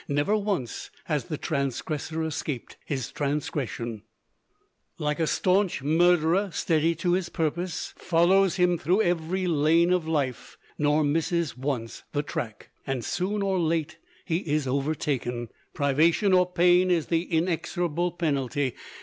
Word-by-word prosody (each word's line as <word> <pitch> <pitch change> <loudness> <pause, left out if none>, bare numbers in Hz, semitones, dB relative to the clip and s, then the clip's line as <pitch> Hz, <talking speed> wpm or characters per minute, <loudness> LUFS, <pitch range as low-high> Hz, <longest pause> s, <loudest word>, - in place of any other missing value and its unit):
Never 145 +9 +1
once 200 - -2
has 150 -6 -1
the 155 - -4
transgressor 150 +3 -2
escaped. 150 -5 -4
His 135 -4 -3
transgression, 140 -6 -3 1.0
"Like 150 0 -1
a 160 - +1
staunch 185 -5 +1
murderer 175 +4 +3
steady 165 0 +1
to 175 +2 0
his 180 -1 0
purpose, 170 +2 -2
Follows 180 +2 +3
him 180 -2 +2
through 180 +7 +2
every 175 +2 0
lane 165 +2 +3
of 175 -3 0
life, 130 -6 -2 0.2
Nor 150 +1 +3
misses 165 +1 0
once 125 -3 -3
the 145 0 0
track," 110 -6 -6 0.2
and 130 -3 -2
soon 200 +3 -1
or 190 -2 +1
late 165 -1 -1 0.3
he 165 - 0
is 155 -5 -1
overtaken. 130 -3 -2 0.3
Privation 160 +8 +3
or 180 -1 +4
pain 180 +1 +4
is 170 -3 +2
the 165 -1 +1
inexorable 170 0 0
penalty. 140 -5 -1
160 Hz, 130 wpm, -26 LUFS, 145-175 Hz, 1.0 s, or